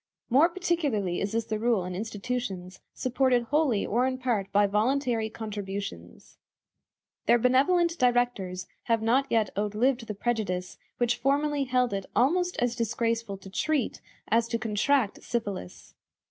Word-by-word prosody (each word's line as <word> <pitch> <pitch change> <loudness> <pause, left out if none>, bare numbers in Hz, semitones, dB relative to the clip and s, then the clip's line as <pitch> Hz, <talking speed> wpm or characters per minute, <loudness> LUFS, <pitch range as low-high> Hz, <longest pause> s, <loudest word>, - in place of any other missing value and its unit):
More 290 +7 +6
particularly 295 - -1
is 200 +1 -2
this 230 -1 0
the 215 -1 -3
rule 225 -5 +1
in 180 - -5
institutions 205 -2 -4
supported 255 -1 +1
wholly 270 -4 +1
or 245 +4 +1
in 260 0 -2
part 235 -7 -1
by 205 0 +4
voluntary 225 +2 +1
contributions. 200 - -7 0.9
Their - - +6
benevolent 330 +8 +3
directors 245 -8 +1 0.2
have 230 -2 +1
not 260 +5 +3
yet 220 -3 +2
outlived 225 +4 0
the 210 - -4
prejudice 200 -5 -2 0.2
which 240 0 +1
formerly 285 +2 +1
held 250 -3 +1
it 195 -1 -3
almost 355 +8 +2
as 245 -1 0
disgraceful 230 -2 -1
to 195 0 -12
treat 295 +3 -1 0.3
as 230 +2 +2
to 230 - -1
contract 225 +2 +1
syphilis. 205 - -5
230 Hz, 140 wpm, -28 LUFS, 205-255 Hz, 0.9 s, More